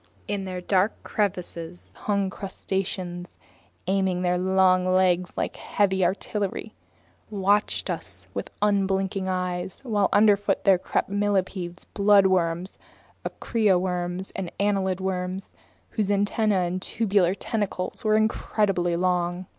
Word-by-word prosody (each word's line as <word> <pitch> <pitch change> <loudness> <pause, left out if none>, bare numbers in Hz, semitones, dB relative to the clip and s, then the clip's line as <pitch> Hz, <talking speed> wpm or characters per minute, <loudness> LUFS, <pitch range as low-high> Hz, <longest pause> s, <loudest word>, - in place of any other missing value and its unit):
In 200 -1 -2
their 185 -1 -4
dark 190 +3 +2
crevices 180 -4 -3
huge 200 -2 +1
crustaceans, 190 -2 -4 0.5
aiming 190 -1 +1
their 180 0 +1
long 185 0 +3
legs 185 -1 +3
like - - -2
heavy 190 -2 +1
artillery, 200 +4 -2 0.6
watched 205 0 +1
us - - -4
with - - -4
unblinking 195 -1 +1
eyes, 180 -1 -2
while 210 -4 +2
underfoot 205 -1 +3
there 190 -3 +5
crept - - -1
millipedes, 190 -3 -1
bloodworms, 190 -3 +3 0.5
aricia 210 -6 +1
worms, 180 0 -3
and 185 -3 -4
annelid 195 -2 +1
worms, 185 0 -3 0.4
whose 210 -2 -1
antennas 205 -1 +2
and 180 +2 -3
tubular 195 -4 +1
tentacles 200 -2 -3
were 215 -1 +3
incredibly 200 -5 +1
long. 180 0 0
190 Hz, 115 wpm, -25 LUFS, 180-205 Hz, 0.6 s, there